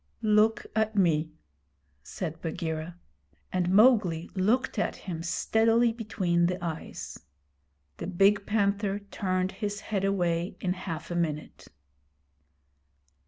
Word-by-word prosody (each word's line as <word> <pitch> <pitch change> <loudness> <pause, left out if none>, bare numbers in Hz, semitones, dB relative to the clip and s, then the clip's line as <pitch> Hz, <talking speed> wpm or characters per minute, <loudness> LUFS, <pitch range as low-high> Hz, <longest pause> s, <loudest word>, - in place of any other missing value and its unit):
'Look 215 +1 +3
at 220 0 +1
me,' 160 -5 +2 0.7
said 165 - -6
Bagheera; 160 +1 -4 0.6
and 180 -1 +1
Mowgli 195 -6 +4
looked 225 +6 +1
at - - 0
him 170 -4 -6
steadily 225 +6 +2
between 185 -7 0
the 180 0 -1
eyes. 165 -2 -6 0.8
The - - -5
big 195 +2 +3
panther 200 -1 +1
turned 185 -2 -2
his 205 +1 -4
head 200 -3 -2
away 175 -2 0
in 180 -2 0
half 170 -3 -6
a - - -2
minute. 155 -3 -3
190 Hz, 115 wpm, -28 LUFS, 170-210 Hz, 0.8 s, Mowgli